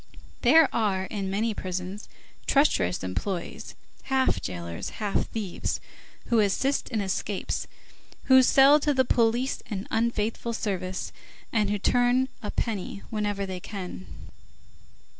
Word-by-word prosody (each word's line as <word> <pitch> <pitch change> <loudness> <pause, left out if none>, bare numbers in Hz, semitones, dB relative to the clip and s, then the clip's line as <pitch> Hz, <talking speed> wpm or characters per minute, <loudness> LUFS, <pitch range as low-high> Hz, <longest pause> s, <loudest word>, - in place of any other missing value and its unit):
There 320 -2 +7
are, 200 -4 +1
in 195 0 -4
many 215 +3 0
prisons, 185 +1 -5 0.4
treacherous 275 - +2
employees, 170 - -4 0.3
half 265 -1 +1
jailers, 85 -2 -5
half 210 -2 -1
thieves, 210 -6 -3 0.5
who 235 - +2
assist 240 +7 +1
in 220 - -1
escapes, 195 0 -2 0.6
who 260 -1 +7
sell 275 +3 +6
to 290 -1 +1
the 260 0 +3
police 240 +3 +1
an 200 -3 -4
unfaithful 230 0 0
service, 190 -4 -3 0.4
and 210 -3 +2
who 205 - +1
turn 245 +5 +2
a 210 - -4
penny 200 -3 -3
whenever 205 -2 -1
they 185 -1 -5
can. 180 - -7
210 Hz, 120 wpm, -27 LUFS, 190-245 Hz, 0.6 s, There